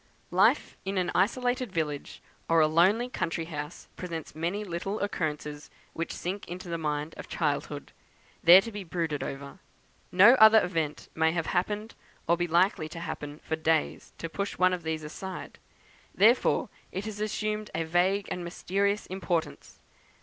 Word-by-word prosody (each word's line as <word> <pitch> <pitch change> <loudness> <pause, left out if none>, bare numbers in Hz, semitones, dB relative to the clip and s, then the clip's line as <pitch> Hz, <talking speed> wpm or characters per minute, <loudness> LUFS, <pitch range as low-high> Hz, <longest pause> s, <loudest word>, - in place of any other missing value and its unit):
Life - - +3
in 195 0 -3
an 180 -1 0
isolated 245 +4 +1
village, 150 -5 -3 0.3
or 165 0 +5
a 155 - +6
lonely 185 +10 +3
country 165 -8 -2
house, 150 -1 -7
presents 165 -4 -6
many 170 +7 -2
little 195 +2 -3
occurrences 150 -6 -3 0.2
which 165 - -3
sink 190 +3 -4
into 180 +1 -7
the 170 0 -2
mind 150 0 -2
of - - -8
childhood, - - -2 0.5
there 175 +3 +10
to 230 - -7
be 205 -2 -6
brooded 165 -4 -2
over. 140 +6 -6 0.5
No 200 +6 +8
other 220 0 +9
event 160 -4 -3
may 160 0 +2
have 165 -2 -1
happened, 210 +4 -1 0.3
or 170 - +4
be 175 0 -1
likely 170 -1 +2
to 165 - -7
happen, 150 -3 -6
for 160 - -1
days, 160 0 0
to 165 - -4
push 200 +5 -4
one 185 0 +4
of 180 - -2
these 160 -1 -3
aside, 185 +5 -7 0.6
before 230 +5 +4 0.2
it 195 +2 -4
has 210 -1 -5
assumed 215 0 -2
a 165 - 0
vague 180 +5 +1
and 180 - -3
mysterious 200 +4 -1
importance. 175 -3 -3
175 Hz, 160 wpm, -28 LUFS, 160-200 Hz, 0.6 s, there